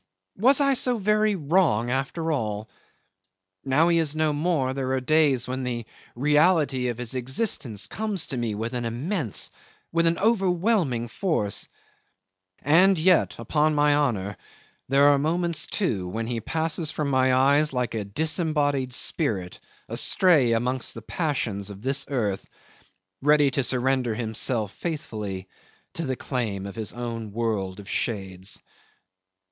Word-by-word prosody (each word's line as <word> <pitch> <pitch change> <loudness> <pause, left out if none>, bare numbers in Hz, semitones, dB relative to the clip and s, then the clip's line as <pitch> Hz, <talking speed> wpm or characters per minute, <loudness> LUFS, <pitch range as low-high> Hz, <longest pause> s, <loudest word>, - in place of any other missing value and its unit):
Was 260 +6 +5
I 275 -1 +3
so 250 -1 +1
very 215 0 +2
wrong 145 - +2
after 150 +5 -1
all? 110 -6 -2 1.0
Now 140 +5 +3
he 170 -1 +3
is 155 -2 -1
no 155 -1 +1
more, 145 -4 0
there 130 -1 -2
are 130 - +1
days 140 -2 +2
when 130 +1 -3
the 120 -3 -3 0.3
reality 150 -1 +3
of 120 -2 -3
his 125 0 -5
existence 130 - -2
comes 210 -5 -3
to 130 - -4
me 115 -3 -2
with 115 +3 -4
an 120 -1 -2
immense, 125 - -2 0.4
with 170 0 +2
an 165 - +2
overwhelming 185 - +1
force; 115 - -1 1.0
and 180 +7 +5
yet 180 +2 +3
upon 155 0 +1
my 145 0 +4
honour 105 -9 0 0.5
there 140 +1 +5
are 145 -1 +5
moments, 165 +1 0
too 105 - -1
when 110 +5 -3
he 115 -1 -3
passes 160 - -1
from 150 -2 -2
my 130 0 +3
eyes 140 +4 +4
like 125 -2 -2
a 110 -2 -2
disembodied 145 - 0
spirit 105 - -2 0.3
astray 150 -11 +4
amongst 125 +2 -1
the 115 - -8
passions 115 - -2
of 100 +1 -10
this 135 +2 0
earth, 105 -8 -2 0.7
ready 145 0 +4
to 135 +1 0
surrender 125 -2 +1
himself 110 -1 -1
faithfully 105 - -5 0.5
to 165 -3 -4
the 130 - -1
claim 110 -8 -3
of 100 - -6
his 110 -2 -3
own 115 -3 -5
world 105 -4 -2
of 100 - -11
shades. 95 -3 -3
135 Hz, 145 wpm, -25 LUFS, 115-160 Hz, 1.0 s, Was